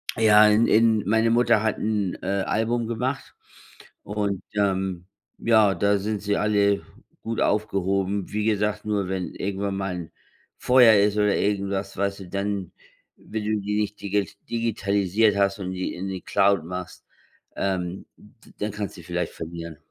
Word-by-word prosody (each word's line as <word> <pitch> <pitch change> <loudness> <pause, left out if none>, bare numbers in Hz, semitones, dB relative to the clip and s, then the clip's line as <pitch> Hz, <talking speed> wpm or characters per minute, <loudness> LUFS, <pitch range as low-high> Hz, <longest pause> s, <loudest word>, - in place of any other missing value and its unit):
Ja, 110 -2 +6
in 105 +2 +4
in 110 -1 +4
meine 110 +2 +3
Mutter 115 -2 +3
hat 110 -1 0
'n, 105 -4 -1
äh, 95 +1 -1
Album 115 +1 0
gemacht 125 +4 -3 0.7
und, 100 -2 -2
ähm, 95 -3 -1 0.3
ja, 110 -4 +4
da 100 +3 +2
sind 105 +1 -3
sie 100 0 0
alle 100 -1 +2 0.4
gut 115 0 -3
aufgehoben. 100 -1 0
Wie 105 0 -1
gesagt, 105 -1 0
nur 105 -3 -1
wenn 90 -3 -3
irgendwann 100 0 -3
mal 95 -1 -3
'n 85 -2 -7 0.5
Feuer 125 -3 +6
ist 105 0 +3
oder 105 -1 +3
irgendwas, 100 -1 -1
weißt 100 0 -1
du, 90 - -9
dann, 100 -1 -3 0.4
wenn 110 -1 -6
du 105 0 0
die 105 +1 -2
nicht 105 0 -4
digi 100 -1 -1 0.2
digitalisiert 105 -2 +1
hast 100 0 +1
und 95 -1 -4
die 95 0 -4
in 95 +2 -5
die 95 -1 -5
Cloud 100 -3 +2
machst, 90 +1 -7 0.5
ähm, 95 -1 -2
d - - -20
dann 105 0 -2
kannst 105 0 -5
die 85 - -11
vielleicht 90 +1 -3
verlieren. 85 -1 -7
100 Hz, 160 wpm, -24 LUFS, 95-105 Hz, 0.7 s, Ja